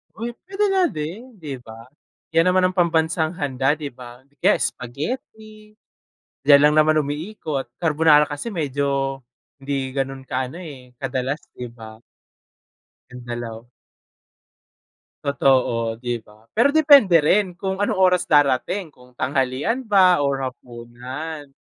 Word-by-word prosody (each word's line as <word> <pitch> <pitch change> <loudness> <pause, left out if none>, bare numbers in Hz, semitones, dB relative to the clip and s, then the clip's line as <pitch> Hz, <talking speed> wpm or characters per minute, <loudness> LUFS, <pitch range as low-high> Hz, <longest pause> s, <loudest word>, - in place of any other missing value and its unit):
Uy, 235 +1 -4 0.2
pwede 395 +2 -1
nga 380 -1 +3
din, 205 - -7
'di 145 -8 -7
ba? 115 0 -13 0.4
'Yan 165 +2 +3
naman 185 0 +3
ang 185 - -9
pambansang 160 -1 +1
handa, 135 0 0
'di 145 -2 -6
ba? 125 0 -13
'Di 140 +1 -34
kaya - - +4
spaghetti, 215 - -6 0.7
diyan 140 0 +7
lang 150 - +1
naman 155 0 +4
umiikot. 145 - -4
Carbonara 155 -2 +4
kasi 150 +10 -5
medyo 140 -3 -1 0.4
hindi 135 -1 -3
gano'n 135 0 -3
kaano, 130 +7 -3
eh, 130 -7 -11
kadalas, 135 +2 -2 0.2
'di 125 -1 -6
ba? 110 -2 -11 1.2
Yung 125 -1 -10
dalaw 120 -1 -6 1.6
Totoo, 125 -5 +1
'di 120 -1 -4
ba? 105 +1 -21
Pero 235 +6 +4
depende 280 - +6
rin 180 +3 +2
kung 190 +1 -3
anong 205 - 0
oras 180 -1 +3
darating, 145 +4 +2
kung 125 0 -21
tanghalian 135 - -1
ba 185 - +4
or 140 -1 +1
hapunan. 125 +5 -8
145 Hz, 130 wpm, -22 LUFS, 130-180 Hz, 1.6 s, diyan